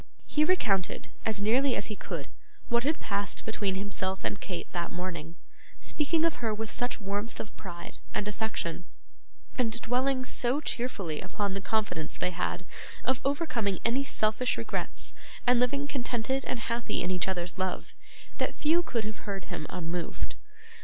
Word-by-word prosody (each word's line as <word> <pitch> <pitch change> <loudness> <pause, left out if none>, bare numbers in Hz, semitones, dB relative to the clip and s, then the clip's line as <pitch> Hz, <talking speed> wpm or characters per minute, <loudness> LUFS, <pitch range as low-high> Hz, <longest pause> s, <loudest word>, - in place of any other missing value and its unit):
He 300 - +3
recounted, 215 - +2 0.2
as 215 -2 +1
nearly 250 +5 +5
as - - 0
he 210 - -3
could, 165 -8 -4 0.4
what 235 0 +4
had 310 +3 +2
passed 200 0 -1
between 205 -3 +1
himself 190 -1 -1
and 205 - -1
Kate 180 -3 -3
that 170 -1 -1
morning: 170 -3 -3 0.4
speaking 320 +2 +2
of 330 - +2
her 225 -3 0
with 220 0 -3
such 245 0 -1
warmth 205 +2 -2
of 215 - -5
pride 175 -3 -7
and 210 -1 0
affection, 210 -5 -2 0.7
and 235 -1 +3
dwelling 255 +2 +2
so 255 +2 +2
cheerfully 220 - -1
upon 195 +1 -1
the 195 - -2
confidence 195 -7 +1
they 180 - +1
had 180 +1 -1 0.4
of 260 0 +2
overcoming 255 - +1
any 250 +4 +3
selfish 220 -1 +2
regrets - - -2 0.3
and 245 0 +6
living 275 +3 +3
contented 260 -1 0
and 240 - -1
happy 235 -4 0
in 180 - +1
each 180 0 +2
other's 180 0 -1
love, 185 -1 -1 0.5
that - - +1
few 325 +3 +4
could 240 -9 -1
have 215 -1 -5
heard 195 -3 -2
him 155 - -3
unmoved. 170 -1 -2
215 Hz, 160 wpm, -31 LUFS, 185-250 Hz, 0.7 s, and